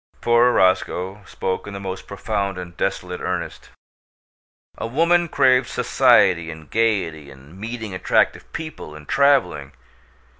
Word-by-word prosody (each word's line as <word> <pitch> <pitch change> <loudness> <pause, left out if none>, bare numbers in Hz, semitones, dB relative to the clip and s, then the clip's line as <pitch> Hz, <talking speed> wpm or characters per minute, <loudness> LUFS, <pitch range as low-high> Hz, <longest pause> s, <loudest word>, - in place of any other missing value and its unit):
Poor 120 +1 +4
Roscoe 95 0 +1
spoke 95 +2 -4
in 100 - -7
the - - -5
most 95 -1 -6
profound 100 -1 -3
and 90 -1 -8
desolate 90 -1 -3
earnest. - - -4 1.1
"A - - -3
woman 170 +7 +2
craves 130 -3 +3
society, 85 -3 +3
and 80 -1 -11
gaiety, 95 -10 0
and 70 +4 -15
meeting 110 0 -6
attractive 90 - 0
people, 155 - -7
and 75 -1 -13
traveling. 140 -1 +2
100 Hz, 125 wpm, -21 LUFS, 90-120 Hz, 1.1 s, Poor